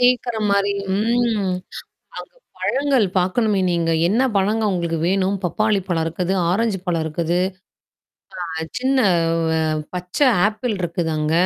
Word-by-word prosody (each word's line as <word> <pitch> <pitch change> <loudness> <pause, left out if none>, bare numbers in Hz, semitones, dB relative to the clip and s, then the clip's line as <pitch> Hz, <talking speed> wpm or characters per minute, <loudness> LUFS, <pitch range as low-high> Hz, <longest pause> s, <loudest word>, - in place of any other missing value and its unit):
சேக்குற 245 -1 +2
மாரி. 200 0 +2 0.2
ம். 220 -3 +1 0.6
அந்த - - -10 0.3
பழங்கள் 275 -5 +1
பாக்கணுமே 200 +3 +1
நீங்க. 170 -1 0 0.2
என்ன 225 +7 +2
பழங்க 210 +3 +1
உங்களுக்கு 170 -3 -1
வேணும்? 195 +1 +1
பப்பாளி 210 +3 +1
பழம் 165 -3 0
இருக்குது, 175 +3 -2 0.2
ஆரஞ்சு 210 +1 0
பழம் 170 -2 0
இருக்குது. 165 +2 -1 1.1
அ - - -6 0.3
சின்ன 260 -2 +2 0.5
அ - - +1 0.3
பச்சை 180 +10 0 0.2
ஆப்பிள் 215 +2 -2
இருக்குது 170 -1 -2
அங்க. 155 +1 0
195 Hz, 125 wpm, -21 LUFS, 175-225 Hz, 1.1 s, சேக்குற